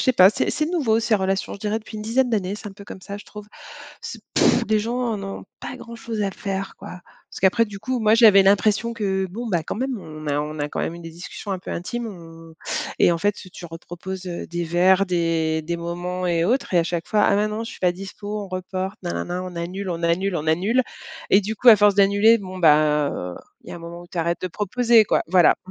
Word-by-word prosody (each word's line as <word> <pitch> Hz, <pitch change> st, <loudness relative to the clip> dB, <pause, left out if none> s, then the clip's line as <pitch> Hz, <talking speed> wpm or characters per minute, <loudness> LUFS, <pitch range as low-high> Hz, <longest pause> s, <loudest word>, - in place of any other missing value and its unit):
je -, -, 0 dB
sais 255 Hz, -, +4 dB
pas. 185 Hz, -2 st, +7 dB
C'est -, -, -1 dB
c'est 305 Hz, +1 st, -1 dB
nouveau 270 Hz, -11 st, +1 dB
ces 225 Hz, -1 st, +2 dB
relations, 190 Hz, 0 st, -1 dB
je -, -, -10 dB
dirais 215 Hz, +1 st, -1 dB
depuis 215 Hz, 0 st, -10 dB
une 210 Hz, -, -5 dB
dizaine 245 Hz, +4 st, +1 dB
d'années, 200 Hz, -4 st, -1 dB
c'est 210 Hz, -, -8 dB
un -, -, -11 dB
peu 200 Hz, +1 st, -13 dB
comme 195 Hz, -, -10 dB
ça, 200 Hz, +1 st, -6 dB
je -, -, -12 dB
trouve. 210 Hz, -1 st, -11 dB, 0.6 s
C'est -, -, -7 dB
pff, -, -, +4 dB
les 215 Hz, -1 st, +3 dB
gens 235 Hz, +3 st, -2 dB
en 230 Hz, -5 st, -2 dB
ont 195 Hz, 0 st, -6 dB, 0.2 s
pas -, -, -6 dB
grand-chose 230 Hz, -3 st, -6 dB
à 200 Hz, -, 0 dB
faire, 195 Hz, 0 st, -4 dB
quoi 180 Hz, -, -9 dB, 0.3 s
parce -, -, -9 dB
qu'après, 195 Hz, +5 st, +4 dB
du 205 Hz, -3 st, -9 dB
coup, 255 Hz, +5 st, -2 dB
moi, 215 Hz, 0 st, +4 dB
j'avais 215 Hz, -4 st, +7 dB
l'impression 210 Hz, +4 st, +3 dB
que, 195 Hz, -4 st, -1 dB
bon, 230 Hz, +5 st, -5 dB
bah, 175 Hz, -6 st, 0 dB
quand -, -, -4 dB
même, 260 Hz, 0 st, -2 dB
on 155 Hz, -4 st, -10 dB
a 145 Hz, 0 st, 0 dB
on 150 Hz, +1 st, -5 dB
a 145 Hz, 0 st, -2 dB
quand -, -, -4 dB
même 165 Hz, -, -2 dB
eu 170 Hz, -, -9 dB
des 165 Hz, -, -8 dB
discussions 175 Hz, +4 st, -8 dB
un 185 Hz, -, -2 dB
peu -, -, -9 dB
intimes, 230 Hz, +7 st, -4 dB
on 165 Hz, -4 st, -11 dB, 0.4 s
et -, -, +5 dB
en -, -, 0 dB
fait, 205 Hz, +5 st, +2 dB, 0.2 s
tu -, -, -10 dB
reproposes, 175 Hz, +3 st, -8 dB
heu, 175 Hz, -1 st, -5 dB
des 175 Hz, 0 st, -3 dB
verres, 185 Hz, +4 st, +3 dB
des 165 Hz, -2 st, 0 dB
des 170 Hz, +2 st, -3 dB
moments 175 Hz, +2 st, -4 dB
et 170 Hz, -1 st, +1 dB
autres, 240 Hz, 0 st, 0 dB
et -, -, +5 dB
à 170 Hz, -, +3 dB
chaque 170 Hz, -1 st, -3 dB
fois: 210 Hz, -1 st, +2 dB
«Ah -, -, +4 dB
mais 210 Hz, +1 st, +1 dB
non, 215 Hz, +2 st, -4 dB
je -, -, -7 dB
suis -, -, -13 dB
pas 180 Hz, -, +3 dB
dispo, 205 Hz, +3 st, -6 dB
on -, -, -11 dB
reporte, 185 Hz, +1 st, -4 dB
nanana», 85 Hz, -, -3 dB
on 180 Hz, -2 st, -8 dB
annule, 185 Hz, +3 st, -4 dB
on 170 Hz, -1 st, -4 dB
annule, 175 Hz, +3 st, +1 dB
on 155 Hz, -1 st, -4 dB
annule, 195 Hz, +11 st, +2 dB, 0.5 s
et 195 Hz, -, +6 dB
du 215 Hz, +2 st, -4 dB
coup, 250 Hz, -, +3 dB
à 225 Hz, -, +11 dB
force 205 Hz, 0 st, +4 dB
d'annuler, 200 Hz, +3 st, +5 dB
bon, 185 Hz, -2 st, -8 dB
ben, 150 Hz, -3 st, +4 dB
heu, 90 Hz, 0 st, -5 dB, 0.3 s
il -, -, -10 dB
y -, -, -6 dB
a -, -, -6 dB
un -, -, -9 dB
moment 170 Hz, +1 st, -9 dB
où -, -, -14 dB
tu 175 Hz, -, -7 dB
arrêtes 170 Hz, +1 st, -1 dB
de 185 Hz, -, -1 dB
proposer, 225 Hz, +4 st, +3 dB
quoi. -, -, +2 dB
Voilà. 180 Hz, -1 st, +5 dB
190 Hz, 260 wpm, -23 LUFS, 170-215 Hz, 0.6 s, à